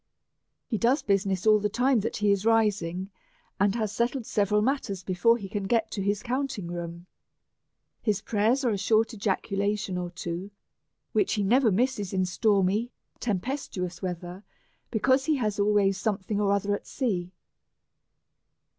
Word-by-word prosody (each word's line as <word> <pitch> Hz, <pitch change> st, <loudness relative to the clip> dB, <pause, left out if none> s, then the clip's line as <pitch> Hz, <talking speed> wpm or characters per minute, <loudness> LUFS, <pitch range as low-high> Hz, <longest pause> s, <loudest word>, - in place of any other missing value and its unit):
He 220 Hz, -, -2 dB
does 250 Hz, +5 st, +2 dB
business 195 Hz, -2 st, 0 dB
ail 215 Hz, -1 st, +6 dB
the 210 Hz, 0 st, 0 dB
time 250 Hz, +3 st, +2 dB
that 215 Hz, -, -3 dB
he 210 Hz, -1 st, +2 dB
is 200 Hz, -1 st, +1 dB
rising, 205 Hz, -5 st, +1 dB, 0.5 s
and 200 Hz, +1 st, +3 dB
has 215 Hz, -3 st, -1 dB
settled 235 Hz, +3 st, -1 dB
several 210 Hz, 0 st, +1 dB
matters 225 Hz, -8 st, -1 dB
before 190 Hz, +6 st, +3 dB
he 200 Hz, -4 st, -7 dB
can 200 Hz, 0 st, -3 dB
get 225 Hz, +2 st, +1 dB
to 200 Hz, -, -3 dB
his 205 Hz, +1 st, -1 dB
counting 255 Hz, -5 st, -2 dB
room. 170 Hz, 0 st, -6 dB, 1.0 s
His 210 Hz, -3 st, +1 dB
prayers 225 Hz, +6 st, +1 dB
are 240 Hz, -, +3 dB
a 200 Hz, -, -1 dB
short 220 Hz, +4 st, +2 dB
ejaculation 200 Hz, -1 st, -1 dB
or 175 Hz, -1 st, -3 dB
two, 175 Hz, +1 st, -5 dB, 0.6 s
which 390 Hz, -, +1 dB
he 205 Hz, -, 0 dB
never 235 Hz, +3 st, +4 dB
misses 210 Hz, -2 st, 0 dB
in 185 Hz, -1 st, +1 dB
stormy 200 Hz, +3 st, +1 dB, 0.3 s
tempestuous 195 Hz, -5 st, -3 dB
weather, 180 Hz, +1 st, -5 dB, 0.5 s
because 260 Hz, +4 st, +2 dB
he 315 Hz, -, +2 dB
has 215 Hz, -6 st, -1 dB
always 200 Hz, -1 st, +3 dB
something 205 Hz, 0 st, -1 dB
or 200 Hz, -1 st, +2 dB
other 200 Hz, 0 st, +1 dB
at 205 Hz, -, -4 dB
sea. 185 Hz, -9 st, -2 dB
205 Hz, 155 wpm, -27 LUFS, 190-230 Hz, 1.0 s, ail